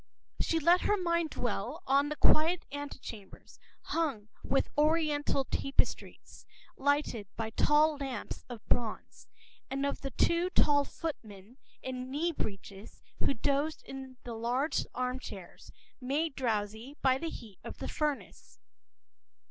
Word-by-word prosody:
She 330 Hz, -, +2 dB
let 340 Hz, +3 st, +5 dB
her 415 Hz, -, +3 dB
mind 340 Hz, -3 st, +1 dB
dwell 250 Hz, -, -3 dB
on 280 Hz, +2 st, +4 dB
the 300 Hz, -, -2 dB
quiet 330 Hz, +4 st, +4 dB
vestibules, 270 Hz, -8 st, -8 dB, 0.2 s
hung 275 Hz, -11 st, -1 dB
with 270 Hz, -, +2 dB
Oriental 300 Hz, -2 st, +2 dB
tapestries, 275 Hz, +1 st, -2 dB, 0.3 s
lighted 285 Hz, -7 st, +1 dB
by 225 Hz, -1 st, -3 dB
tall 300 Hz, +5 st, +4 dB
lamps 270 Hz, -5 st, -4 dB
of 235 Hz, -3 st, -8 dB
bronze, 230 Hz, -3 st, -1 dB, 0.4 s
and 275 Hz, +1 st, 0 dB
on 280 Hz, -, +1 dB
the 275 Hz, -, -3 dB
two 340 Hz, +7 st, +2 dB
tall 290 Hz, -5 st, +4 dB
footmen 220 Hz, -, -7 dB, 0.3 s
in 255 Hz, 0 st, -4 dB
knee 310 Hz, +6 st, +1 dB
breeches 200 Hz, -, -6 dB, 0.2 s
who 275 Hz, -, +1 dB
dozed 285 Hz, +5 st, 0 dB
in 265 Hz, -1 st, -8 dB
the 240 Hz, -, -5 dB
large 245 Hz, +6 st, 0 dB
armchairs, 250 Hz, -7 st, -5 dB, 0.3 s
made 285 Hz, +5 st, 0 dB
drowsy 225 Hz, +2 st, -2 dB
by 260 Hz, -1 st, +4 dB
the 330 Hz, -, -2 dB
heat 215 Hz, -10 st, -10 dB
of -, -, -7 dB
the -, -, -4 dB
furnace. 300 Hz, -3 st, -3 dB
275 Hz, 130 wpm, -32 LUFS, 235-305 Hz, 0.4 s, let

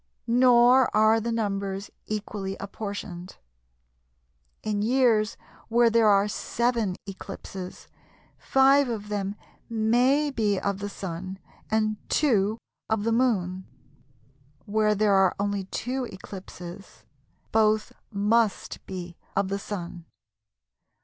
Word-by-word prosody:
Nor 245 Hz, +1 st, +5 dB
are 220 Hz, +1 st, +5 dB
the 235 Hz, +1 st, -2 dB
numbers 200 Hz, -3 st, -2 dB, 0.2 s
equally 205 Hz, -2 st, -4 dB
apportioned. 200 Hz, -3 st, -6 dB, 1.3 s
In 210 Hz, -1 st, -1 dB
years 230 Hz, -2 st, +2 dB, 0.3 s
where 235 Hz, 0 st, +4 dB
there 230 Hz, -1 st, +4 dB
are 200 Hz, 0 st, +5 dB
7 230 Hz, -2 st, -1 dB
eclipses, 190 Hz, -1 st, -8 dB, 0.5 s
5 270 Hz, 0 st, +4 dB
of 210 Hz, -3 st, -4 dB
them 200 Hz, -1 st, -2 dB, 0.3 s
may 245 Hz, +6 st, +2 dB
be 210 Hz, -6 st, +1 dB
of 200 Hz, -1 st, -2 dB
the 205 Hz, 0 st, -4 dB
Sun 185 Hz, 0 st, -6 dB, 0.3 s
and 215 Hz, -1 st, +1 dB
2 220 Hz, -7 st, +2 dB, 0.3 s
of 220 Hz, -2 st, +1 dB
the 230 Hz, -, +1 dB
Moon; 190 Hz, -7 st, +1 dB, 1.0 s
where 210 Hz, 0 st, +2 dB
there 210 Hz, 0 st, +3 dB
are 190 Hz, -1 st, +4 dB
only 200 Hz, -1 st, -1 dB
2 250 Hz, +6 st, -3 dB
eclipses, 190 Hz, -2 st, -10 dB, 0.5 s
both 215 Hz, -1 st, +2 dB, 0.2 s
must 210 Hz, +1 st, 0 dB
be 180 Hz, -2 st, -6 dB, 0.2 s
of 195 Hz, -1 st, +1 dB
the 200 Hz, +1 st, -2 dB
Sun. 175 Hz, -4 st, -6 dB
210 Hz, 110 wpm, -26 LUFS, 195-230 Hz, 1.3 s, Nor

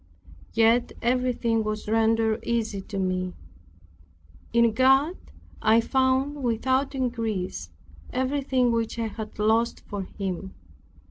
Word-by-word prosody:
Yet 230 Hz, +2 st, +3 dB
everything 240 Hz, -2 st, +1 dB
was 215 Hz, 0 st, -4 dB
rendered 225 Hz, 0 st, +2 dB
easy 225 Hz, -4 st, -1 dB
to 200 Hz, +1 st, -7 dB
me. 185 Hz, -1 st, -1 dB, 1.2 s
In 235 Hz, -1 st, +4 dB
God 270 Hz, +7 st, +4 dB, 0.5 s
I 220 Hz, +1 st, +5 dB
found, 265 Hz, +4 st, +1 dB
without 260 Hz, +3 st, 0 dB
increase, 220 Hz, -, -2 dB, 0.4 s
everything 260 Hz, -1 st, +1 dB
which 230 Hz, 0 st, -1 dB
I 230 Hz, -, -1 dB
had 215 Hz, 0 st, -8 dB
lost 220 Hz, +3 st, +1 dB
for 205 Hz, -2 st, -4 dB
Him. 190 Hz, 0 st, -5 dB
230 Hz, 110 wpm, -26 LUFS, 215-255 Hz, 1.2 s, I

